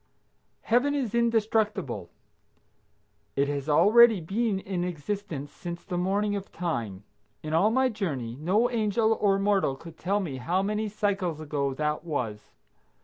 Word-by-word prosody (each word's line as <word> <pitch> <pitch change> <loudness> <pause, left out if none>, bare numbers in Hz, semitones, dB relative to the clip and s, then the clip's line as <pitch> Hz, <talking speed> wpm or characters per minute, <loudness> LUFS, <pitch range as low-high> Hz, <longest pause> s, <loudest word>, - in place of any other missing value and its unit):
Heaven 255 +5 +2
is 255 -7 -2
indestructible. 220 - 0 1.3
It 140 +1 +2
has 145 0 -3
already 220 +7 +6
been 200 +4 -1
in 190 -2 -3
existence 170 -3 -4
since 170 +1 -7
the 180 - -4
morning 200 +3 0
of 200 -1 -6
time. 115 - -3 0.4
In 155 0 -4
all 180 +7 +4
my 260 +3 +3
journey, 150 - -3
no 185 - +2
angel 220 -1 +2
or 200 -3 +2
mortal 195 -8 +1
could 160 +3 -13
tell 200 +3 0
me 155 -9 -4
how 175 +9 0
many 210 +1 -1
cycles 195 -6 -1
ago 145 -3 -2
that 150 +1 -1
was. 120 -10 -4
190 Hz, 145 wpm, -27 LUFS, 150-210 Hz, 1.3 s, already